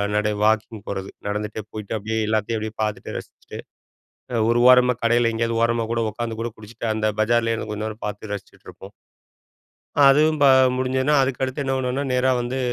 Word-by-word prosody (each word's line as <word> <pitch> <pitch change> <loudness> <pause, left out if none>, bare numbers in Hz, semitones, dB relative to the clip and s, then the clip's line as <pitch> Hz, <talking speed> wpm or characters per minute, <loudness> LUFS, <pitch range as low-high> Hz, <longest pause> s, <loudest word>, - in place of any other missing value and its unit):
நடை 105 0 +1
வாக்கிங் 110 -1 0
போறது 95 -1 -4 0.2
நடந்துகிட்டே 105 +1 -3
போயிட்டு 105 0 -5
அப்படியே 110 +2 -3
எல்லாத்தையும் 110 +1 0
அப்படியே 110 0 -6
பாத்துட்டு 105 -1 -4
ரசிச்சிட்டு - - -10 0.9
ஒரு 120 +1 +3
ஓரமாக 125 -1 +5
கடையில் 120 0 +3
எங்கேயாவது 115 0 -1
ஓரமா 115 0 +1
கூட 115 0 0
உட்காந்து 115 +1 -5
கூட 115 - -2
குடிச்சிட்டு 110 +2 -8
அந்த 110 0 -1
பஜாரிலேயே 115 +1 +2
இருந்து 110 -1 -5
கொஞ்ச 105 0 -4
நேரம் 110 0 -7
பார்த்து 105 +1 -6
ரசிச்சிட்டுருப்போம். 100 0 -10 1.1
அதுவும் 155 +3 +4
ப - - +7 0.3
முடிஞ்சதுனா 130 +3 +1
அதுக்கு 130 -1 -2
அடுத்து 130 +2 -3
என்ன 135 -1 -2
பண்ணுவோம்னா 130 +2 -2
நேரா 125 +1 +2
வந்து, 120 +2 -3
115 Hz, 165 wpm, -22 LUFS, 110-125 Hz, 1.1 s, ப